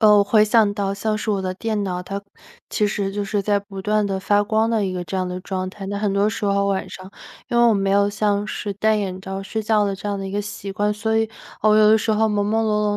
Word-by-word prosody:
呃， 210 -2 +6
回 210 +1 +4
想 215 -1 +3
到 200 -1 -1
像 215 +2 -1
是 215 +1 -2
我 200 -2 0
的 185 -1 -3
电 215 +1 -2
脑， 180 -1 -3
它 195 +2 -5 0.5
其 210 - +1
实 200 -1 -2
就 205 0 -3
是 205 0 -1
在 205 +1 +1
不 200 -1 -9
断 210 +2 +1
地 195 -1 -2
发 205 +1 +2
光 220 +2 +1
的 225 -3 +1
一 185 - -2
个 180 -1 -3
这 175 +3 -4
样 185 -1 -1
的 180 0 -5
状 185 0 -4
态。 195 0 -8
那 200 +1 -3
很 205 -2 0
多 200 +1 +2
时 215 -1 -4
候 200 0 +2
晚 195 -1 -1
上， 185 +1 -10 0.4
因 240 - -1
为 240 - +6
我 225 - +4
没 195 -1 0
有 200 +1 +3
像 205 0 0
是 205 -1 -4
戴 215 +2 +2
眼 190 -3 -3
罩 195 0 -5
睡 220 +2 -4
觉 210 -1 +2
的 195 - -1
这 205 - -8
样 200 -1 -2
的 195 - -4
一 - - -5
个 205 +1 -2
习 205 -1 -7
惯， 205 +2 0
所 220 +1 -1
以， 225 0 +1 0.3
我 215 0 +5
有 215 0 +6
的 220 - +6
时 220 - -1
候 220 +1 +3
朦 205 -1 0
朦 225 +1 +1
胧 210 -1 +1
205 Hz, 305 characters per minute, -21 LUFS, 195-215 Hz, 0.5 s, 呃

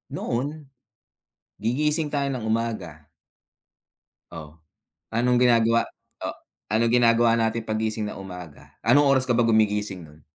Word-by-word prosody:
noon 125 +4 -2 1.2
gigising 150 +6 +1
tayo 140 -1 0
ng 125 -4 -5
umaga. 110 -9 -3 1.3
Oh, 80 -1 -10 0.6
anong 125 +2 +2
ginagawa, 115 -1 +3 0.4
oh, - - -4 0.4
anong 115 +2 +2
ginagawa 115 -1 +4
natin 115 0 0
paggising 110 -1 -2
na - - -8
umaga, 90 -5 -11
anong 145 0 +4
oras 135 -2 +3
ka - - +4
ba 120 - +3
gumigising 105 -4 +1
no'n? 75 0 -19
115 Hz, 120 wpm, -24 LUFS, 105-120 Hz, 1.3 s, ginagawa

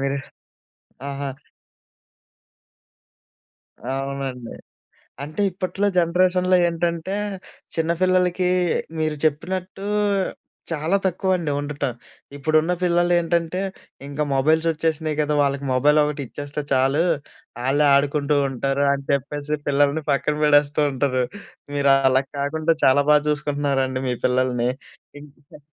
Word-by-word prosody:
మీరు 140 +1 -1 0.9
ఆహా! 140 0 -4 2.7
అవునండి. 135 -3 -4 0.7
అంటే, 155 +7 -4
ఇప్పట్లో 185 +3 -2
జనరేషన్‌లో 180 +1 +3
ఏంటంటే, 170 +2 -2 0.6
చిన్న 165 0 +1
పిల్లలకీ 185 -1 +2 0.5
మీరు 155 -1 0
చెప్పినట్టూ 185 +5 -2 0.9
చాలా 165 +5 +1
తక్కువండి 185 -3 0
ఉండటం. 145 -2 -3 0.4
ఇప్పుడున్న 155 +4 +1
పిల్లలేంటంటే, 175 0 +1 0.5
ఇంక 145 +1 -9
మొబైల్సొచ్చేసినాయి 160 +1 +1
గదా! 150 0 0
వాళ్ళకి 140 0 -1
మొబైలొకటిచ్చేస్తే 145 +1 0
చాలు. 135 +5 +3 0.6
ఆళ్ళే 145 +3 +3
ఆడుకుంటూ 145 +1 +1
ఉంటారు 135 +2 -1
అని 140 0 -5
చెప్పేసి, 145 +2 -2
పిల్లలని 145 +2 +2
పక్కనబడేస్తూ 150 0 +2
ఉంటారు. 130 -1 0 0.5
మీరలాగ 135 -1 +3
కాకుండా 155 +3 0
చాలా 140 +2 +5
బా 150 - +7
చూసుకుంటున్నారండి 140 -3 0
మీ 125 - 0
పిల్లలని. 125 -1 +1 0.5
ఇంటికా 145 0 -16
150 Hz, 90 wpm, -22 LUFS, 140-165 Hz, 2.7 s, బా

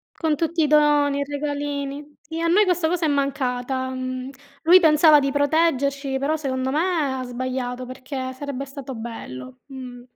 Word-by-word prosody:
Con 315 -3 0
tutti 330 +2 0
i - - +4
doni 295 -1 +3
i - - 0
regalini. 285 0 -4
Sì 320 +3 -7
a 335 - 0
noi 380 +6 +5
questa 355 -4 +1
cosa 340 -1 0
è - - +1
mancata, 265 -2 -1
mhmm, 255 0 -4 0.3
lui 350 +3 +8
pensava 310 -2 +6
di 275 0 -1
proteggerci, 280 -2 +1
però 285 +4 0
secondo 260 -3 -2
me 310 -2 0
ha - - -3
sbagliato 250 0 -4
perché 260 +1 -6
sarebbe 275 0 -5
stato 270 -1 -8
bello, 130 - -8
mh. 255 -3 -9
280 Hz, 165 wpm, -23 LUFS, 260-300 Hz, 0.3 s, lui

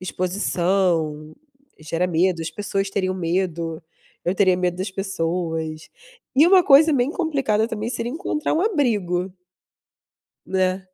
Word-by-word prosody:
exposição, 175 -4 -1 0.4
gera 165 +3 -2
medo, 175 0 +1
as 160 - -4
pessoas 195 +2 -3
teriam 185 -1 -1
medo, 170 -2 -2 0.4
eu 175 +2 0
teria 185 -2 +3
medo 180 -1 -1
das 185 +2 -4
pessoas. 165 -4 -3 0.5
E 300 +4 +7
uma 370 0 +6
coisa 305 +3 +6
bem 255 0 +1
complicada 275 - 0
também 220 -1 -4
seria 240 -1 -3
encontrar 310 -1 -2
um 320 - +1
abrigo. 210 - 0 1.1
Né. 185 0 -1
185 Hz, 125 wpm, -22 LUFS, 170-220 Hz, 1.1 s, E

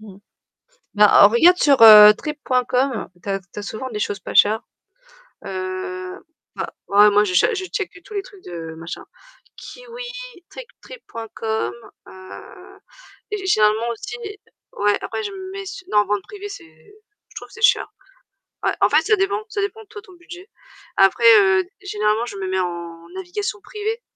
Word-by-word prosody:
Mmh. 205 -3 -14 0.8
Bah, 210 -1 +6
en - - +9
regarde 335 +12 +5
sur, 280 -6 +3
heu, 210 -1 +11
Trip.com, 255 -2 -2
tu - - -10
as 195 0 -1
tu 180 +2 -14
as - - -5
souvent 220 +5 -6
des 215 - -5
choses 205 -1 -3
pas - - -8
chères. 215 +3 +4 0.8
Heu, 185 -1 -6 0.4
bah, - - -5 0.2
ouais, 205 +1 +6
moi 205 +1 +3
je 185 -3 -3
cha 455 - +3
je 380 -2 -4
checke 385 +1 -5
tous 425 - -13
les 400 - -2
trucs 390 -1 -17
de 165 -2 -8
machin. 165 +1 -9 0.5
Kiwi, - - -10 0.5
Trip - - -10
Trip.com, 225 - -5 0.3
heu, 185 0 -13 0.5
gé 405 -2 -4
généralement 215 - +2
aussi 425 - -7 0.6
ouais, 205 0 +2
après - - -4
je 415 - -4
me 380 -1 -8
mets 390 0 -7
su 390 0 -9
non, 210 0 +3
vente 205 -1 -1
privée 410 0 -9
c'est 400 - -10 0.7
je - - -21
trouve - - -9
que - - -18
c'est 460 - -12
cher, - - +3 0.8
ouais, - - +2
en - - +5
fait, - - +4
ça 430 - +2
dépend, 390 +2 -1
ça 420 -1 -4
dépend 425 +2 -5
toi, 420 0 -11
ton 385 - -18
budget. 355 +2 -13 0.5
Après, - - +3 0.2
heu, 385 -1 +3 0.2
généralement, 215 - -1
je 200 - -8
me 190 - -5
mets 190 0 -1
en 170 -2 -6
navigation 380 +2 -5
privée 435 +2 -5
235 Hz, 175 wpm, -20 LUFS, -, 0.8 s, heu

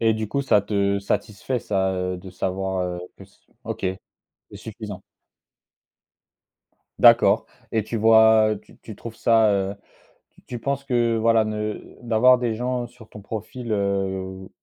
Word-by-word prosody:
Et 110 -1 +3
du 110 -1 -4
coup, 140 +5 -1
ça 105 -6 +4
te 100 -1 0
satisfait 105 +5 -2
ça, 95 -4 -1
heu, 90 0 -2
de 95 +1 -11
savoir, 95 +1 -2
heu, 90 -1 -3 0.2
que - - -12
s - - -26 0.2
OK, - - -5 0.7
c'est - - -9
suffisant. 105 -3 -8 2.0
D'accord - - +6 0.3
et 110 -2 0
tu 115 - -4
vois 110 -1 +5
tu - - -20
tu 110 - -11
trouves 115 +1 -9
ça, 110 -2 +4
heu, 100 0 -1 0.6
tu - - -24
tu 120 - -6
penses 140 +2 -2
que, 120 -3 +1
voilà, 115 0 +3
ne 105 0 -5
d'avoir 120 +2 +4
des 120 -2 -1
gens 125 +1 -2
sur 120 -2 -17
ton 105 - -11
profil, 110 +3 -6
heu, 95 -2 -2
110 Hz, 155 wpm, -23 LUFS, 100-115 Hz, 2.0 s, D'accord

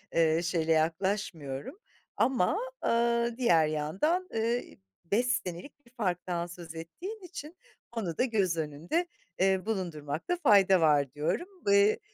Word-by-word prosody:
eee, 165 0 +3
şeyle 165 -1 0
yaklaşmıyorum. 160 - -1 0.4
Ama, 255 - +2 0.3
ııı, 235 0 +2
diğer 165 -11 +4
yandan, 190 - 0
ııı, 230 +2 +1 0.4
5 215 +8 +1
senelik 250 - -3
bir 235 - -22
farktan 180 -6 -2
söz 170 -2 -10
ettiğin 355 - -7
için, 345 -1 -9 0.3
onu 200 -9 -3
da - - +3
göz 200 -9 +1
önünde, 160 - -1 0.3
eee, 190 0 +2
bulundurmakta 170 - -2
fayda 195 - +6
var, 145 -4 +3
diyorum. 150 - -1 0.2
Eee, 200 +1 +5
185 Hz, 125 wpm, -30 LUFS, 165-235 Hz, 0.4 s, fayda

